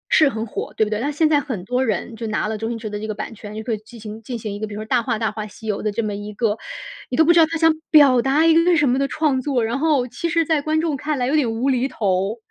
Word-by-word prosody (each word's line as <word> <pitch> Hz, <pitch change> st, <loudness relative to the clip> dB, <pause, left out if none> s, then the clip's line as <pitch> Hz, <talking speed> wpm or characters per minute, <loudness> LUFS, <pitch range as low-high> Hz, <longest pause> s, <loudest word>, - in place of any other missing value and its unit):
是 305 Hz, -3 st, +6 dB
很 225 Hz, -2 st, -4 dB
火， 215 Hz, -, -6 dB
对 220 Hz, -, +3 dB
不 210 Hz, -, -6 dB
对？ 210 Hz, -, -1 dB
那 280 Hz, +4 st, -1 dB
现 310 Hz, +2 st, +2 dB
在 300 Hz, -2 st, +3 dB
很 220 Hz, -11 st, -5 dB
多 250 Hz, +4 st, 0 dB
人 225 Hz, 0 st, -2 dB
就 225 Hz, 0 st, -5 dB
拿 215 Hz, 0 st, -1 dB
了 220 Hz, -, -2 dB
周 225 Hz, +1 st, -3 dB
星 235 Hz, -, -3 dB
驰 225 Hz, -1 st, -6 dB
的 210 Hz, 0 st, -5 dB
这 215 Hz, -, -5 dB
个 215 Hz, -, -4 dB
版 225 Hz, -, -6 dB
权， 210 Hz, 0 st, -10 dB
就 220 Hz, -, -5 dB
可 230 Hz, 0 st, -2 dB
以 -, -, -1 dB
进 230 Hz, +2 st, -14 dB
行 215 Hz, +1 st, -8 dB
进 240 Hz, +2 st, -5 dB
行 215 Hz, -2 st, -5 dB
一 205 Hz, -, -6 dB
个 215 Hz, -, -3 dB
比 205 Hz, -, -8 dB
如 210 Hz, -, -5 dB
说 -, -, -6 dB
《大 250 Hz, -2 st, +3 dB
话 230 Hz, -1 st, -1 dB
大 220 Hz, -2 st, -1 dB
话 215 Hz, 0 st, -5 dB
西 220 Hz, -, -14 dB
游》 205 Hz, -1 st, -1 dB
的 210 Hz, -, 0 dB
这 230 Hz, +2 st, -2 dB
么 210 Hz, -, -2 dB
一 205 Hz, +1 st, -6 dB
个 210 Hz, 0 st, 0 dB, 0.5 s
你 250 Hz, -, -2 dB
都 320 Hz, -, +5 dB
不 345 Hz, -, +6 dB
知 340 Hz, -, +5 dB
道 325 Hz, -, +7 dB
它 330 Hz, 0 st, -3 dB
想 325 Hz, 0 st, +4 dB, 0.2 s
表 275 Hz, -6 st, +6 dB
达 285 Hz, +5 st, +2 dB
一 325 Hz, -, +6 dB
个 330 Hz, -, +5 dB
为 355 Hz, -1 st, +4 dB
什 295 Hz, -3 st, +3 dB
么 255 Hz, +2 st, +2 dB
的 275 Hz, -, +1 dB
创 290 Hz, -4 st, 0 dB
作， 260 Hz, -4 st, 0 dB
然 235 Hz, +4 st, -2 dB
后， 290 Hz, -5 st, +2 dB
其 335 Hz, +7 st, -4 dB
实 330 Hz, -1 st, +2 dB
在 310 Hz, -2 st, +1 dB
观 310 Hz, +1 st, 0 dB
众 320 Hz, -4 st, -1 dB
看 295 Hz, +2 st, -2 dB
来 245 Hz, -, 0 dB
有 285 Hz, -, +1 dB
点 260 Hz, -7 st, +2 dB
无 230 Hz, +4 st, -1 dB
厘 255 Hz, 0 st, +1 dB
头。 200 Hz, -2 st, -1 dB
240 Hz, 370 characters per minute, -21 LUFS, 215-295 Hz, 0.5 s, 道